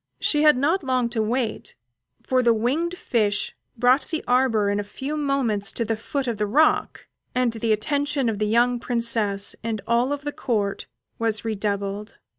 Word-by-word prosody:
She 295 - +2
had 300 -3 +6
not 315 +7 +1
long 255 -3 +1
to 230 -2 -1
wait, 225 +1 -2 0.5
for 255 -1 +2
the 235 -2 +4
winged 310 +11 -1
fish 210 - 0 0.2
brought 250 +4 +3
the 320 -2 -3
arbour 245 -4 +3
in 205 - 0
a - - -1
few 265 +8 -5
moments 260 -9 0
to 230 - -2
the 225 +1 0
foot 270 +5 -3
of 235 -3 -2
the 210 0 0
rock, 305 +9 +2 0.3
and 250 -2 +2
the 225 0 -1
attention 280 +4 0
of 215 -3 -1
the 215 - +1
young 240 +3 +3
Princess 230 -5 0
and 225 -1 -2
of - - -29
all 245 +5 +2
the 290 +1 -5
Court 210 -8 -2 0.3
was 225 -1 -1
redoubled. 205 -1 -3
235 Hz, 180 wpm, -24 LUFS, 215-270 Hz, 0.5 s, had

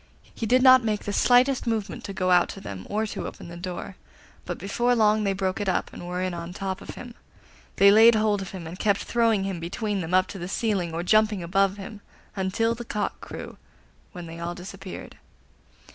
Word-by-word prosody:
He 225 - -4
did 255 +3 +4
not 255 -1 +8
make 215 -2 -1
the 205 - -3
slightest 250 +3 +3
movement 220 -3 -2
to - - -5
go 185 -1 0
out 175 -1 +5
to - - -7
them 95 - -8
or 215 +2 0
to 215 - -5
open - - -9
the 170 - -9
door, 180 +1 -6 0.5
but 175 - -4
before 240 +6 0
long 215 -1 +3
they 195 - +1
broke 190 +1 -2
it 200 - 0
up, 185 - -1
and 175 - -8
were 180 +1 -2
in 185 -1 -2
on 170 +1 -6
top 190 0 -4
of - - -9
him. 245 -1 -9 0.6
They 200 0 +7
laid 225 +2 +7
hold 215 -2 +1
of 190 - -6
him, 185 -4 -8
and 170 +4 -8
kept 200 -1 +1
throwing 230 -4 +2
him 195 -3 -3
between 195 +4 -3
them 175 +2 -1
up 185 0 +4
to 195 - -7
the 175 - -5
ceiling, 190 -4 -1
or 165 +1 -3
jumping 215 0 +3
above 195 +3 +1
him, 205 +1 -9 0.3
until 200 +4 0
the 235 +1 -7
cock 210 -3 -3
crew, - - -8 0.5
when 175 -3 -8
they 165 0 -9
all 170 +1 -4
disappeared. 185 +1 -9
195 Hz, 220 wpm, -25 LUFS, 180-220 Hz, 0.6 s, not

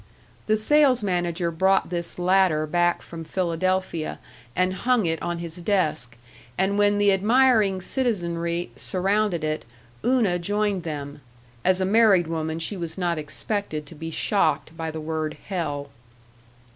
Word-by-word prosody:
The 215 0 +3
sales 265 +1 +4
manager 175 -2 -1
brought 190 +3 +2
this 170 -1 -3
latter 180 -3 +3
back 175 +3 +1
from 165 -1 -8
Philadelphia 185 -1 -1 0.4
and 185 0 +1
hung 240 +2 +1
it 165 -1 -1
on 175 0 -2
his 170 0 -6
desk, 155 - -1 0.4
and 200 +2 +1
when 205 0 +4
the 205 0 +4
admiring 210 -1 +3
citizenry 175 -8 -1
surrounded 195 -2 0
it, 155 0 -2 0.4
Una 230 -8 +2
joined 205 +1 0
them.... 145 -3 -6 0.4
As 185 0 +3
a 185 - +1
married 200 -3 +5
woman 160 -1 -3
she 165 +5 -1
was 170 -2 -5
not 175 -3 0
expected 155 +1 -3
to 145 - -12
be 165 +1 -6
shocked 160 -4 0
by 165 -1 -4
the 160 0 -5
word, 155 0 -3
"hell!"... 145 -7 -3
175 Hz, 145 wpm, -24 LUFS, 160-200 Hz, 0.4 s, married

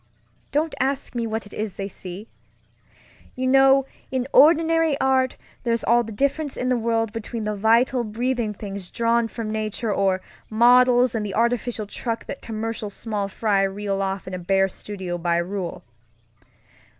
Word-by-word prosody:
Don't 305 +2 0
ask 275 0 -1
me 235 -2 -2
what 220 0 -3
it 205 - -14
is 210 -3 -4
they 195 - -3
see. 190 +2 -9 1.1
You 255 - -2
know, 270 +1 +5 0.2
in 260 -1 -2
ordinary 325 -1 +5
art, 260 -1 +2 0.3
there's 230 -1 0
all 240 +1 +4
the 225 - -8
difference 280 +6 -1
in 250 - -1
the 250 - +3
world 225 -2 0
between 225 0 -5
the 210 0 -2
vital, 235 +4 +3
breathing 235 +1 -1
things 195 -2 -7
drawn 235 0 +1
from 225 -1 -5
nature 215 0 -2
or 190 -1 +1 0.3
models 245 +2 +5
and 225 -2 -1
the 200 -2 -4
artificial 235 -1 0
truck 230 +2 -4
that - - -7
commercial 225 -1 -4
small 205 -1 -3
fry 200 0 +1
reel 195 0 -1
off 195 0 -2
in 185 - -6
a 185 - -3
bare 195 +2 +2
studio 185 -3 -6
by 170 0 +1
rule. 180 +1 -3
225 Hz, 160 wpm, -23 LUFS, 200-250 Hz, 1.1 s, know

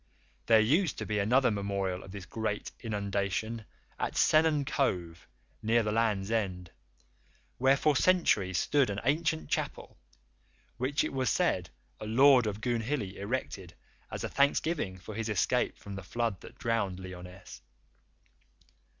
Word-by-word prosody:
There 115 -1 +7
used 155 - +2
to - - -4
be 105 -1 -1
another 125 +5 +3
memorial 100 -2 -2
of - - -12
this 100 -2 -8
great 110 0 -3
inundation 105 +1 -2 0.3
at - - -2
Sennen 155 -2 +4
Cove, 90 - -1 0.3
near 115 +1 +3
the 105 - -1
Land's 105 -2 0
End, 90 -6 -2 0.9
where 135 +2 +4
for 150 0 +2
centuries 130 - +3
stood 140 -4 +2
an 100 0 -2
ancient 140 - 0
chapel - - -3 0.8
which 135 +4 0
it - - -3
was 130 -2 0
said - - +1 0.3
a 110 - -6
Lord 130 +1 +6
of 105 0 -4
Goonhilly 115 -3 -2
erected 100 -4 -4 0.3
as - - -5
a - - -1
thanksgiving 140 - +1
for 95 +4 -9
his 115 +1 -3
escape 100 -4 +1
from 100 - -9
the 95 - -6
flood 115 0 -2
that - - -13
drowned 100 -6 -1
Lyonesse. 90 0 -10
110 Hz, 140 wpm, -30 LUFS, 95-130 Hz, 0.9 s, There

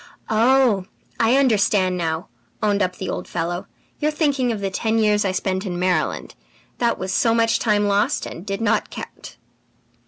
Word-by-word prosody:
"'Oh, 230 -3 +3 0.3
I 230 +3 +4
understand 205 -7 +3
now,' 165 -1 -2 0.4
owned 205 -1 +2
up 185 -1 0
the 190 - -6
old - - -4
fellow. 175 +2 -3 0.3
'You 300 - +1
are - - +2
thinking 285 -5 +1
of 220 - -3
the 195 -1 -2
ten 220 +3 0
years 210 -1 +3
I 195 - 0
spent 190 0 -1
in 180 -4 -4
Maryland; 180 0 -1 0.5
that 235 -1 +1
was 190 0 -3
so 230 +3 +3
much 230 0 +2
time 210 -2 +2
lost 200 +1 +1
and 170 - -8
did 195 +1 -4
not 225 -1 +1
count!'" - - -9
205 Hz, 180 wpm, -22 LUFS, 185-230 Hz, 0.5 s, I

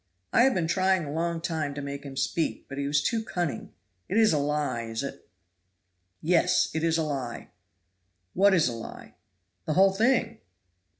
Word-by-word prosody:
"I - - +5
have 265 - +3
been 175 - +1
trying 185 0 +2
a 145 - -6
long 165 +1 -2
time 155 -4 -2
to 145 - -4
make 140 0 -6
him 135 -2 -9
speak, 135 +5 -1
but 135 0 -6
he 140 - -1
was 145 0 +2
too 225 +6 0
cunning. 175 -8 -3 0.4
It 195 - 0
is 220 -5 +5
a 150 - +2
lie, 145 -4 -1
is 115 +2 -4
it?" 140 - -8 0.9
"Yes, 170 +2 +3
it 160 - -2
is 165 -1 +2
a 160 - +1
lie." 135 -6 -4 0.8
"What 195 +1 +5
is 165 - +3
a 120 - -2
lie?" 115 -1 -9 0.5
"The 155 - 0
whole 190 +2 +5
thing." 230 +5 +1
160 Hz, 185 wpm, -27 LUFS, 140-185 Hz, 0.9 s, I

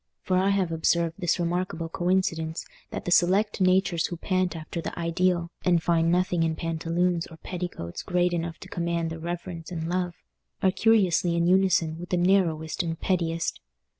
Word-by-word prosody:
For 185 - 0
I 190 +2 +3
have 195 -4 +1
observed 165 0 +1
this 175 -3 +1
remarkable 175 -1 -1
coincidence, 170 -2 -1 0.2
that - - -6
the 175 - -2
select 195 +4 +3
natures 185 -2 +3
who 175 - -6
pant 185 0 0
after 165 +1 -5
the - - -6
ideal, 170 0 0
and 175 -3 +3
find 165 -1 +2
nothing 180 -1 +1
in 160 -1 +1
pantaloons 165 +2 -1
or 165 - -13
petticoats 175 - -5
great 180 -1 +1
enough 170 -1 -3
to - - -9
command 170 -1 -2
their 165 - -6
reverence 170 0 -5
and 165 -2 -3
love, 180 0 -1 0.5
are 190 - +5
curiously 185 -4 +3
in 170 0 +2
unison 180 -3 +3
with 175 - -8
the 180 - +1
narrowest 175 -4 +2
and 165 -2 -3
pettiest. 170 -3 -1
175 Hz, 170 wpm, -26 LUFS, 165-185 Hz, 0.5 s, are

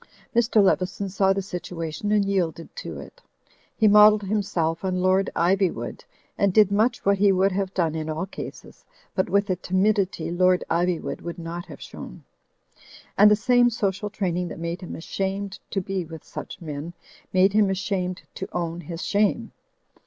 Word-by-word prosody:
Mr. 225 -2 +4
Leveson 190 +1 +1
saw 190 0 +2
the 195 0 0
situation 175 0 -4
and 210 -1 +3
yielded 175 -4 -2
to - - -6
it. - - -12 0.6
He 220 - +4
modelled 210 0 +7
himself 185 -5 -1
on 185 -1 -1
Lord 185 +2 +2
Ivywood 185 +1 0 0.4
and 200 -1 +3
did 210 0 +5
much 225 +5 +1
what 200 0 +3
he 200 0 +5
would 190 +1 +3
have 190 0 -2
done 165 -4 +1
in 160 -1 -4
all 155 +3 -2
cases, 195 - -9 0.3
but 185 - 0
with 200 0 +2
a 180 - 0
tim 185 +1 0
idity 195 -5 0
Lord 180 0 +3
Iv3rwood 175 0 0
would 170 +1 -6
not 170 +1 -6
have - - -10
shown. - - -10 0.9
And 210 - +7
the 210 - +6
same 245 +2 +4
social 210 -3 -2
training 180 -4 -2
that - - -7
made 170 +2 -4
him 180 - -7
ashamed 195 +3 -4
to 195 - -1
be 190 0 -3
with 160 -1 -10
such - - -8
men, 155 0 -6 0.4
made 190 +1 +4
him 210 -2 +4
ashamed 190 -1 -2
to - - -6
own 170 0 -3
his 170 -1 -6
shame. 210 +3 +1
190 Hz, 175 wpm, -24 LUFS, 175-200 Hz, 0.9 s, modelled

